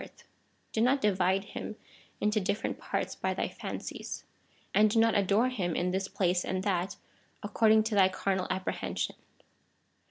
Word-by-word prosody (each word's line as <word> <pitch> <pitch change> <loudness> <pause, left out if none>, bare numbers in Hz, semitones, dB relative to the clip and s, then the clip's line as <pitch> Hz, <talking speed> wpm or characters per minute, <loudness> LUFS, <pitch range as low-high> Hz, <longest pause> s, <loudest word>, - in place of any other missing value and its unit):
381 210 -5 +1 0.4
into 210 +1 +2
different 200 +2 -2
parts - - -2
by - - -2
thy - - -1
fancies, - - -6 0.5
and 215 +1 +5
do 215 - 0
not 225 0 +4
adore 205 +5 +3
him 180 -10 -2
in 180 +1 0
this 190 +1 -1
place 180 -2 +1
and 185 0 -2
that, 190 -2 0 0.5
according 215 +1 +4
to 220 0 -2
thy 195 -2 +5
carnal 190 0 -1
apprehension. 190 0 -2
200 Hz, 130 wpm, -30 LUFS, 185-215 Hz, 0.5 s, and